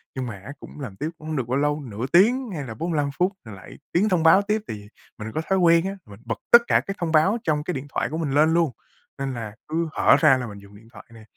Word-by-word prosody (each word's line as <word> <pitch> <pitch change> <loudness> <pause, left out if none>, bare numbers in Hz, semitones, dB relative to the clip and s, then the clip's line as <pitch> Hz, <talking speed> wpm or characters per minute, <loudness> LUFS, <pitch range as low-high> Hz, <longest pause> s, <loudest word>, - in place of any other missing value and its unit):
nhưng 130 -1 -3
mà 115 - -6
á 140 - -7
cũng - - -12
làm 125 -9 -7
tiếp 150 +10 -3
cũng 155 - -11
hông 155 - -3
được 130 -5 -2
bao 130 +2 0
lâu, 145 +1 0
nửa 115 -3 -5
tiếng 235 +8 +4
hay 155 -6 -4
là 115 -4 -7
45 150 +2 -1
phút 180 +2 +2
rồi 110 -2 -9
lại 95 - -13
tiếng 200 +5 +2
thông 180 -4 +1
báo 165 +4 +6
tiếp, 210 +2 -1
thì 105 -1 -7 0.3
mình 110 +1 -6
có 155 - 0
thói 190 0 +2
quen 170 -1 +4
á, 195 +1 -3
mình 100 0 -14
bật 115 -1 -4
tất 235 - +10
cả - - +4
cái 195 - -6
thông 170 -2 -2
báo 160 +8 +3
trong 150 -3 0
cái 180 - -3
điện 140 -1 -6
thoại - - -1
của 160 - -4
mình 160 -4 -2
lên 155 +3 +3
luôn, 165 -4 +2 0.5
nên 135 -1 -3
là 110 -3 -7
cứ 165 +2 -1
hở - - +4
ra 150 -5 +5
là 125 -2 -4
mình 100 -2 -10
dùng 100 0 -16
điện 110 +2 -17
thoại - - -13
nè. 115 -1 -14
150 Hz, 290 wpm, -23 LUFS, 120-170 Hz, 0.5 s, tất